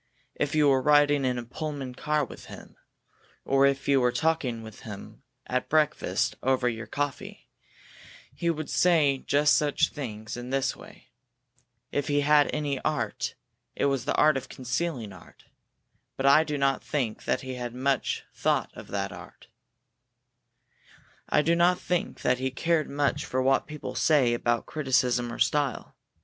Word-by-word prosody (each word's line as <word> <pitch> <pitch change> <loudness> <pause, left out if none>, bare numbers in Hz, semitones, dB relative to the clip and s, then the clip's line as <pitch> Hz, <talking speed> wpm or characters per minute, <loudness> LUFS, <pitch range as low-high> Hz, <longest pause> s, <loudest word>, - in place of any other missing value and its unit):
If 150 +1 -2
you 150 -1 +4
were 135 -2 +4
riding 145 0 +4
in 125 -1 0
a 120 - -4
Pullman 140 +1 -5
car 150 +3 0
with - - -12
him, - - -12 0.7
or 135 0 +4
if 140 0 -1
you 140 -2 +4
were 125 0 +3
talking 125 -4 -1
with 110 -1 -11
him 105 -3 -10 0.2
at 125 0 -2
breakfast 155 -1 +1
over 130 -1 +1
your 115 -2 -3
coffee, 145 +3 -5 0.8
he 170 - -1
would 155 -2 -2
say 155 -6 +3
just 145 +2 +3
such 150 -2 +2
things 110 -6 -6
in 120 0 -6
just - - -8 0.2
this - - -4
way. - - -15 0.8
If 145 -1 -1
he 145 0 +2
had 150 0 +4
any 145 -3 -2
art, 145 -9 -2 0.4
it - - 0
was 135 -3 0
the - - 0
art 155 -2 +4
of 135 - -7
concealing 125 - -3
art. 90 - -17 0.7
But 135 - -2
I 145 +3 +6
do 150 -1 -2
not 135 -1 +1
think 125 -7 -3
that - - 0
he 130 -1 -6
thought 120 -1 -4
much 130 +1 -1 0.2
of - - -1
art. - - -6 1.8
I 150 - +3
do 170 +2 +3
not 175 +1 +3
think 180 -1 -2
that 125 0 +2
he 130 0 -1
cared 160 +3 0
much 140 0 0
for 130 - -2
what 135 +1 +2
people 150 -1 -7
say 140 -7 +3
about 120 0 0
criticism 125 -4 0
or - - -6
style. 145 -4 0
140 Hz, 160 wpm, -27 LUFS, 125-150 Hz, 1.8 s, I